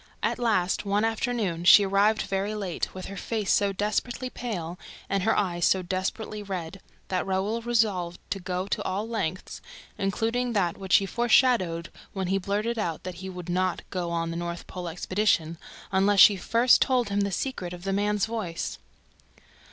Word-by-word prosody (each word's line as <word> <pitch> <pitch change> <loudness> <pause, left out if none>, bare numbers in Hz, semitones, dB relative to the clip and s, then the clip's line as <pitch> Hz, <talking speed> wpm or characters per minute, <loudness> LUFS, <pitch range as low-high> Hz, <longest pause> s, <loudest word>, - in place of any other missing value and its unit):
At - - 0
last, 210 -7 +1
one 205 +1 +1
afternoon, 225 -6 -1
she 190 +3 +8
arrived 200 +3 +3
very 195 +2 -2
late, 195 -5 -3
with 185 - -6
her 195 - -7
face 215 +1 -2
so 200 -1 +2
desperately 215 +5 -2
pale 180 -10 -5 0.3
and 195 -1 0
her 220 +4 +2
eyes 175 -4 0
so 190 -1 +3
desperately 190 +4 -3
red, 190 -2 -6 0.3
that 185 -1 0
Raoul 195 +4 -1
resolved 215 -7 0
to 195 - -1
go 180 0 -3
to 200 - -2
all 200 +4 -2
lengths, 195 -6 -4 0.4
including 225 +5 0
that 180 -5 +1
which 190 -1 +1
he 195 - +4
foreshadowed 220 -6 +2 0.2
when 190 -2 -2
he 195 +1 +2
blurted 210 +5 -1
out 170 -6 -2
that 185 -1 -6
he 190 - -5
would 180 -2 -8
not 185 0 0
go 180 -2 -2
on 165 0 -1
the 165 - -4
North 170 0 -4
Pole 180 -1 -6
expedition 170 -2 0 0.3
unless 195 +1 +3
she 205 - +9
first 230 +6 +4
told 250 -5 +2
him 200 0 0
the 200 0 0
secret 185 -4 -3
of 175 -1 -9
the 195 0 -1
man's 205 0 +1
voice. 215 -7 -4
195 Hz, 175 wpm, -27 LUFS, 180-215 Hz, 0.4 s, she